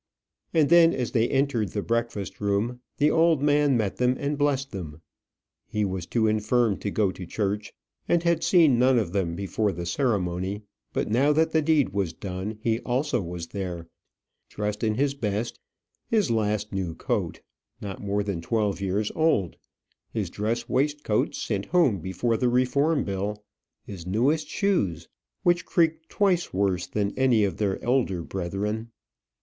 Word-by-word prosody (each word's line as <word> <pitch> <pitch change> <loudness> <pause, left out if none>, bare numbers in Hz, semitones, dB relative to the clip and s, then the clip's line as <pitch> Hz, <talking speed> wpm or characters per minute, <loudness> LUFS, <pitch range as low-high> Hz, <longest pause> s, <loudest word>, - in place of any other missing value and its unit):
And 155 -3 +3
then, 170 0 +6
as 125 -2 -2
they 115 -1 +2
entered 135 -7 +1
the 105 - -2
breakfast 115 -4 -2
room, 105 +5 0 0.2
the 150 +1 +3
old 160 -3 +3
man 145 -2 +3
met 105 -4 -1
them, 125 0 +2
and 145 +1 -1
blessed 140 -1 0
them. 80 -5 -7 0.7
He 105 -1 -1
was 95 -2 -4
too 115 -2 +1
infirm 110 0 +2
to 105 - -3
go 100 -1 +1
to 95 - -9
church, 105 +2 -2 0.4
and 170 -1 +3
had 170 -1 +2
seen 155 -9 +5
none 130 0 +4
of 105 -7 0
them 90 -4 0
before 100 +2 -1
the 85 -1 -5
ceremony; 95 -2 -1 0.3
but - - -1
now 135 +6 +4
that 160 +1 +2
the 160 - +3
deed 150 -6 +3
was 95 -4 -2
done, 95 +4 -5
he 115 -1 +1
also 130 +1 0
was 85 -1 -6
there, 90 -4 -5 0.6
dressed 105 +1 -3
in 110 -1 +1
his 140 +3 +1
best, 110 -3 -3 0.5
his 215 - +2
last 105 -2 0
new 90 -4 -2
coat, - - -2 0.4
not 100 -2 -6
more 100 0 -1
than 100 -4 -3
twelve 105 +1 -1
years 100 +2 -1
old, 155 - +1 0.6
his - - -3
dress 115 +3 -2
waistcoat 145 -4 0
sent 100 -3 -2
home 155 - +3
before 95 +7 -1
the 125 +2 +2
Reform 140 +4 +2
Bill, 100 +2 -3 0.4
his 90 -4 -9
newest 135 - +1
shoes, 95 - 0 0.4
which 175 0 +3
creaked 160 -1 +1
twice 185 -4 +1
worse 95 -2 0
than 100 +2 -1
any 125 -5 +3
of 95 -5 -1
their 100 -3 0
older 120 -9 +1
brethren. 100 +6 -3
110 Hz, 165 wpm, -26 LUFS, 100-140 Hz, 0.7 s, then